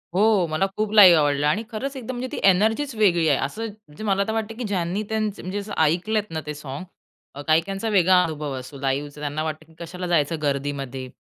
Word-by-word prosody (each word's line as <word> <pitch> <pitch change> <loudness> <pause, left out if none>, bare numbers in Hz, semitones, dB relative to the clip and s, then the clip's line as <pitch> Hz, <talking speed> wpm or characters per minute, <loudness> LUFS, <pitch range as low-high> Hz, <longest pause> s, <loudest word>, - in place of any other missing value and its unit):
हो. 205 -2 +4
मला 155 +4 0
खूप 215 -1 -1
लाईव्ह 185 -6 +9
आवडलं 145 0 +2
आणि 205 +9 +1
खरंच 265 +6 -4
एकदम 255 0 -6
म्हणजे 255 +1 -3
ती - - -4
एनर्जीच 220 +9 +1
वेगळी 175 -6 +3
आहे. 140 - +3
असं 225 +1 -5
म्हणजे 215 -5 -11
मला 200 -2 +2
तर - - -1
वाटतं 225 0 -3
की 250 - -4
ज्यांनी 195 -1 -1
त्यांचं 215 -2 -2
म्हणजे 185 +3 -4
असं 205 +1 -7
ऐकलेत 205 +7 0
ना 160 -1 -3
ते 150 - -4
सॉन्ग, 145 +2 -7 0.6
काही-काहींचा 195 +7 +1
वेगळा 185 -2 +5
अनुभव 150 -3 -4
असतो, 130 +2 -10
लाईव्हचा. 140 +2 -2
त्यांना 150 +1 -2
वाटतं 155 0 -5
की 160 - -22
कशाला 180 +2 -6
जायचं 165 -2 +1
गर्दीमध्ये? 140 -2 -3
180 Hz, 205 wpm, -23 LUFS, 150-215 Hz, 0.6 s, लाईव्ह